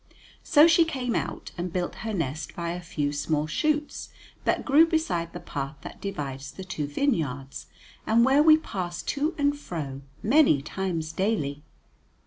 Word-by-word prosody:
So 295 +1 +6
she 335 0 +6
came 260 -7 -2
out - - -3
and 175 0 -3
built 180 0 -2
her 220 - -3
nest 160 -5 -3
by 170 -1 -3
a 175 +1 -5
few 145 -4 -2
small 150 +1 0
shoots 300 - -1 0.4
that - - +1
grew 300 +4 +6
beside 180 - -1
the - - -7
path 140 +1 -5
that - - -10
divides 140 -8 -5
the 190 - -8
two 155 -5 -4
vineyards, 145 - -2 0.4
and 230 +2 +5
where 270 +3 +5
we 310 0 +7
passed 180 - -5
to 300 +4 0
and 285 0 +2
fro 150 - -6 0.2
many 225 - +4
times 165 -1 -3
daily. 160 -8 -1
180 Hz, 160 wpm, -26 LUFS, -, 0.4 s, we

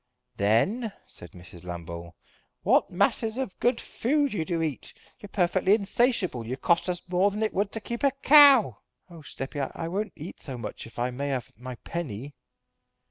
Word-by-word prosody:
"Then," 190 - +1
said 85 - -11
Mrs. 90 -1 -12
Lambole, 85 -1 -7 0.5
"what - - +3
masses 225 +1 +1
of 260 -8 -4
good 240 -1 +2
food 285 +2 0
you 175 -6 -1
do 170 -1 -1
eat. 150 -5 -4 0.2
You're 205 - -11
perfectly 185 +1 +3
insatiable. 205 - +1
You 125 +3 -4
cost 170 +5 +1
us 175 -1 -3
more 185 +2 +3
than 210 +2 -3
it 215 - -1
would 200 +1 0
to 225 - -2
keep 235 +2 -6
a 280 - +6
cow." 275 -3 +6 0.3
"Oh, 165 -2 -11
steppy, 140 0 -6 0.2
I 165 - -4
won't 200 +5 -3
eat 160 +3 -9
so 130 -4 -5
much 110 -1 -7
if 115 - -17
I 120 +1 -1
may 140 +3 -4
have 130 -4 -3
my 125 +2 -8
penny!" 145 -5 -5
175 Hz, 180 wpm, -27 LUFS, -, 0.5 s, a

